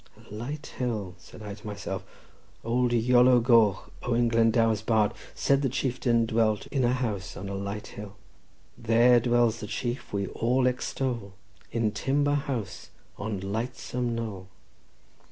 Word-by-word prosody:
"A - - -15
light 140 +8 -5
hill!" 110 -7 -2
said 110 - -13
I 105 -1 -6
to 105 +1 -11
myself. 105 -1 -5 0.6
"Old 120 +1 +1
Iolo 125 +1 +5
Goch, 115 -5 +3
Owen 120 -1 +1
Glendower's 115 -1 +3
bard, 110 -2 +2 0.2
said 140 0 +2
the 135 - +1
chieftain 120 -2 +1
dwelt 110 -2 +1
in 135 -3 +1
a 120 - +3
house 105 -7 -3
on 100 - -6
a - - -4
light 100 +2 -4
hill." 105 -1 -9 0.6
"There 120 +2 +5
dwells 120 -1 +2
the 105 - -6
chief 120 +4 -4
we 100 -1 -1
all 125 +2 +1
extol 125 -4 -2 0.4
In 115 -2 0
timber 140 +6 +1
house 130 -8 -3 0.3
on 100 -2 -3
lightsome 120 +3 -3
knoll." 105 -5 -5
115 Hz, 145 wpm, -27 LUFS, 105-125 Hz, 0.6 s, Iolo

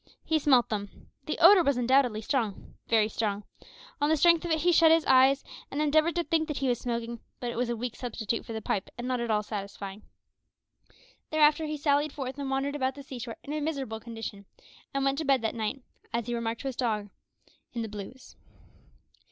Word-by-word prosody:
He 320 -1 +2
smelt 265 -5 +4
them. 205 -2 -6 0.2
The - - -2
odour 400 -2 +8
was 280 -4 +2
undoubtedly 250 -3 +3
strong 230 -5 -2
very 220 -2 +3
strong. 210 -2 -2 0.6
On 290 - +3
the 315 - +3
strength 335 +2 +5
of 345 - -3
it 320 -1 +1
he 350 +3 +4
shut 330 -1 +6
his 325 -1 +4
eyes, 265 +1 +5 0.3
and 280 - -4
endeavoured 310 +3 +3
to 345 - +1
think 325 -2 0
that 300 - -3
he 270 - 0
was 245 -2 +1
smoking; 235 -1 -3 0.2
but 240 -1 -3
it - - -7
was 245 0 -1
a 240 - 0
weak 235 +1 -4
substitute 230 -2 -3
for - - -9
the 220 -1 -5
pipe, 190 - -2
and 240 +1 -4
not 255 -1 0
at 235 0 -3
all 210 -1 +2
satisfying. 200 -1 -6 1.3
Thereafter 310 0 +4
he 305 0 -3
sallied 290 0 +1
forth 270 -1 -5
and 275 -1 -3
wandered 270 +2 -1
about 265 -2 -1
the 280 - -9
sea 265 -2 -8
shore 230 -1 -6
in 290 - -5
a 305 - -2
miserable 275 -8 -3
condition, 225 -3 -7 0.5
and 275 0 -1
went 275 +1 +1
to - - -1
bed 270 -4 +2
that 220 - 0
night 235 +4 -3 0.3
as 235 -1 -1
he 240 - -3
remarked 230 -1 -2
to 275 - -4
his 260 - -6
dog 215 -5 -1 0.6
in 235 -1 -2
the - - -4
blues. 210 +5 -9
255 Hz, 215 wpm, -28 LUFS, 225-290 Hz, 1.3 s, odour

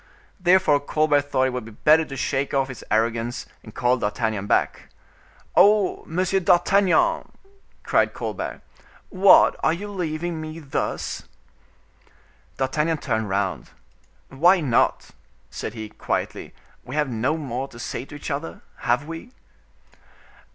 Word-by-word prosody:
Therefore 180 -5 +4
Colbert 145 0 +1
thought 130 - +2
it - - +1
would 125 -2 -3
be - - -9
better 155 +8 +4
to 135 -2 -8
shake 135 +3 -1
off 135 -1 +1
his 130 - -8
arrogance 115 +2 0 0.2
and 110 - -14
call 125 +1 +2
D'Artagnan 105 -2 -2
back. - - 0 0.7
"Ho! 205 -1 +4
Monsieur 185 +3 0
d'Artagnan," 180 0 +3 0.5
cried - - +2
Colbert, - - -5 0.5
"what! 190 0 +6
are 155 - +3
you 200 +5 -5
leaving 170 -3 -3
me 155 0 -7
thus?" 150 -4 -3 1.3
D'Artagnan 150 +5 0
turned 110 -7 -2
round: 95 0 -2 0.6
"Why 175 +8 +4
not?" 135 -8 +1 0.4
said 110 - -6
he, 110 -1 -6
quietly, - - -4 0.3
"we 130 - -7
have 150 -1 +1
no 120 +7 0
more 135 -3 -4
to 115 - -14
say 120 - -5
to 145 - -11
each 145 - -6
other, 145 +4 -5 0.2
have 125 +4 0
we?" 165 +9 -8
145 Hz, 135 wpm, -23 LUFS, 120-165 Hz, 1.3 s, what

